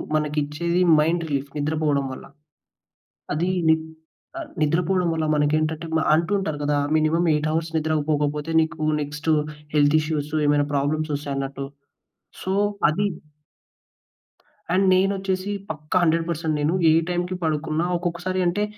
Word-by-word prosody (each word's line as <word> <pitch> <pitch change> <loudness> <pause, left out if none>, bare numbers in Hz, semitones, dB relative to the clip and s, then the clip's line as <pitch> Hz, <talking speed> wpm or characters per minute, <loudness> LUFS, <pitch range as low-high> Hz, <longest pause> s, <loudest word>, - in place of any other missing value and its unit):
మనకిచ్చేది 150 +3 0 0.2
mind 165 +3 +1
relief. 140 -1 -2
నిద్రపోవడం 150 -1 0
వల్ల. - - -10 1.1
అది 170 +4 0 0.2
ని 160 - +7 0.9
నిద్రపోవడం 175 +4 +1
వల్ల 160 -1 -1
మనకేంటంటే 155 +2 0 0.3
అంటుంటారు 170 -1 0
గదా! 145 0 +1 0.2
మినిమమ్ 160 +2 +2
8 150 +1 0
అవర్స్ 165 +1 -1
నిద్ర 160 0 0 0.2
పోకపోతే 150 +1 0
నీకు 160 0 -2 0.2
నెక్స్ట్ 150 +2 -3 0.4
హెల్త్ 145 0 +4
ఇష్యూస్, 155 -1 -3
ఏమైనా 145 0 +3
ప్రాబ్లమ్స్ 155 +3 0
వస్తాయి 145 -1 -4
అన్నట్టు. 135 0 -4 0.8
సో, 190 - -2 0.4
అది 200 +7 +1 1.7
అండ్ 190 +2 +3
నేనొచ్చేసి 190 0 0 0.2
పక్కా 155 +3 -2
100% 165 -1 0
నేను 150 +3 +1 0.2
ఏ - - +5 0.2
టైంకి 180 +1 -1
పడుకున్న 155 0 -1 0.2
ఒక్కొక్కసారి 175 +2 -3
అంటే 195 +4 0
155 Hz, 120 wpm, -23 LUFS, 150-170 Hz, 1.7 s, ని